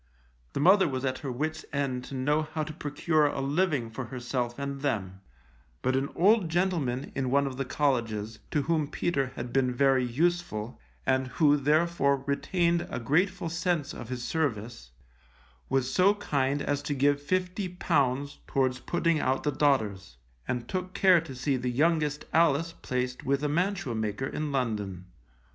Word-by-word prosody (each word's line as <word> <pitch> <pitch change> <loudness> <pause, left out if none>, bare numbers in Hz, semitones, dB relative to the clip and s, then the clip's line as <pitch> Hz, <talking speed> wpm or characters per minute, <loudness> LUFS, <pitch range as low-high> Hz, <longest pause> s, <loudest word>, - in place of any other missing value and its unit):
The - - -2
mother 190 +5 +6
was 130 -1 -2
at 130 -1 -1
her 135 - -4
wits' 155 +5 -3
end 135 -3 -1
to 140 - -7
know 145 +4 +1
how 155 0 -3
to 155 0 -6
procure 150 0 +1
a 145 - -3
living 140 -4 0
for 125 +3 -5
herself 120 -1 -3
and 140 -1 -4
them, 95 -9 -2 0.6
but 130 - +2
an 135 +1 0
old 200 -1 +4
gentleman 160 -8 0
in 130 -2 -1
one 140 +2 +3
of 130 -2 -4
the 135 - -2
colleges, 115 -6 -1
to 145 - 0
whom 155 -1 +1
Peter 135 -5 -1
had 120 0 -6
been 130 -2 +2
very 130 0 +3
useful, 125 -4 -1 0.3
and 130 0 +2
who 145 +2 +3
therefore 145 -1 +2
retained 170 +4 +1
a - - -3
grateful 180 - +1
sense 170 -3 -1
of 120 - -8
his 125 -1 -4
service, 115 - -2 0.8
was 135 -1 0
so 195 +3 +5
kind 140 -8 0
as 145 0 -1
to 145 0 -2
give 145 +1 +2
fifty 185 +4 -1
pounds 145 -6 0
towards 130 -2 +1
putting 170 -2 +1
out 130 -1 0
the 150 - +1
daughters, 110 - 0 0.3
and 120 -1 -2
took 185 +3 -4
care 185 -4 +5
to 155 -5 -9
see 130 +2 0
the 125 0 -2
youngest 150 +2 +1
Alice 165 0 +3
placed 125 0 -2
with 140 +2 0
a - - +2
mantua 175 -3 0
maker 110 +2 -2
in 150 +2 -3
London. 105 -9 -2
140 Hz, 170 wpm, -28 LUFS, 125-160 Hz, 0.8 s, mother